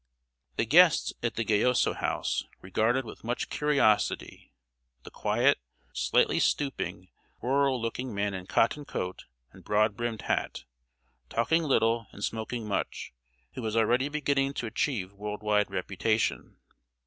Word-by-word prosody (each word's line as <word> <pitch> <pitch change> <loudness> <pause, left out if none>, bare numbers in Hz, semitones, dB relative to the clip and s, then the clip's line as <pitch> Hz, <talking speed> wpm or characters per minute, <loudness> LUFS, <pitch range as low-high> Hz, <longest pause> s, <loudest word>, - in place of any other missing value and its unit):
The - - +1
guests 165 +7 +5
at 120 - -1
the 115 - 0
Gayoso 110 +4 +3
House - - -1
regarded 110 +7 0
with 110 - -10
much 120 +2 -2
curiosity 140 -8 +1 0.5
the - - -11
quiet, - - +2 0.3
slightly - - +2
stooping, 135 -10 -1 0.3
rural 135 0 +1
looking 120 +2 -3
man 100 -1 -1
in 95 -1 -6
cotton 145 +6 +2
coat 90 -9 -5 0.3
and - - -16
broad 105 0 +2
brimmed 120 -1 -3
hat, - - -2 0.7
talking 160 +9 +2
little 115 -6 +2
and 100 - -9
smoking 110 0 -3
much, 100 - -3 0.4
who 130 - -6
was 110 -1 -2
already 120 +5 +2
beginning 140 -2 0
to - - -3
achieve 110 -4 -2
world 105 +1 -6
wide 105 -1 +2
reputation. 100 +4 -1
115 Hz, 135 wpm, -28 LUFS, 105-130 Hz, 0.7 s, guests